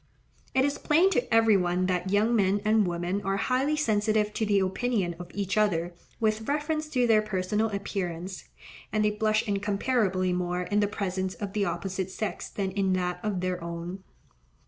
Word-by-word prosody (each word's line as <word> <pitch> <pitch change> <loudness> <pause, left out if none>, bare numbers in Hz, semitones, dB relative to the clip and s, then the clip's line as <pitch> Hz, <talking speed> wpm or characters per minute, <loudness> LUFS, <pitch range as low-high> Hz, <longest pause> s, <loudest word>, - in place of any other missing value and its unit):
It 265 0 +4
is 285 - -1
plain 340 +6 +4
to 245 -10 0
every 225 -2 +5
one 180 -1 +1
that 185 0 -1
young 210 +4 +3
men 200 -1 +3
and 215 -2 +3
women 175 +3 -2
are 195 0 -1
highly 265 +7 +1
sensitive 215 -5 +1
to 220 - -1
the 205 -1 +3
opinion 190 -1 0
of 175 -1 -8
each 200 0 -2
other 175 -4 +1 0.3
with 220 -1 0
reference 305 +1 -1
to 250 -5 +2
their 220 -2 +5
personal 210 +1 -1
appearance; 190 -3 -4 0.5
and 215 0 +1
they 210 - +3
blush 215 0 +1
incomparably 200 -2 +1
more 180 0 -1
in 205 +3 0
the 205 - +3
presence 190 -2 -3
of 200 -2 -5
the 210 -2 +1
opposite 190 -1 -3
sex 205 +2 -4
than 195 -2 -3
in 190 -1 +1
that 180 -1 -1
of 205 -4 -2
their 180 -1 -2
own. 170 +3 -6
200 Hz, 180 wpm, -27 LUFS, 185-220 Hz, 0.5 s, every